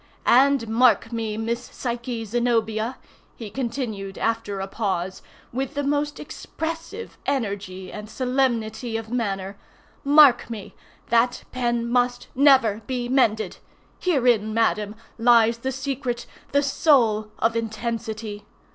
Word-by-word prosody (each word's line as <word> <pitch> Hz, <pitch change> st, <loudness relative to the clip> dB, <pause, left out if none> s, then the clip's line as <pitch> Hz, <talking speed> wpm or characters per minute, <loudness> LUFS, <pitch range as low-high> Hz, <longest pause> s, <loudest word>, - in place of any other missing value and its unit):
And, 270 Hz, -1 st, +4 dB
mark 225 Hz, 0 st, +3 dB
me, 225 Hz, -2 st, -3 dB
Miss 230 Hz, +2 st, -2 dB
Psyche 240 Hz, -2 st, -4 dB
Zenobia!" 230 Hz, +1 st, 0 dB, 0.4 s
he 220 Hz, -4 st, -8 dB
continued, 225 Hz, -5 st, -4 dB
after 225 Hz, -3 st, -1 dB
a 190 Hz, -, -2 dB
pause, 190 Hz, -3 st, -2 dB, 0.3 s
with 265 Hz, +2 st, -3 dB
the 285 Hz, -, -1 dB
most 290 Hz, +1 st, -1 dB
expressive 330 Hz, +7 st, -6 dB
energy 200 Hz, -8 st, -3 dB
and 210 Hz, 0 st, -7 dB
solemnity 240 Hz, -3 st, -1 dB
of 225 Hz, 0 st, -7 dB
manner, 195 Hz, -5 st, -2 dB, 0.5 s
"mark 285 Hz, -5 st, +6 dB
me!—that 230 Hz, +2 st, -2 dB
pen—must—never 245 Hz, 0 st, +2 dB
be 245 Hz, -2 st, -2 dB
mended! 225 Hz, -5 st, +2 dB, 0.4 s
Herein, 240 Hz, -, +2 dB
madam, 215 Hz, -2 st, +1 dB, 0.2 s
lies 230 Hz, -1 st, +5 dB
the 265 Hz, +3 st, -2 dB
secret, 265 Hz, -2 st, -3 dB, 0.3 s
the 285 Hz, 0 st, +3 dB
soul, 235 Hz, -7 st, +3 dB
of 225 Hz, 0 st, +1 dB
intensity. 220 Hz, -2 st, -4 dB
235 Hz, 110 wpm, -24 LUFS, 220-255 Hz, 0.5 s, mark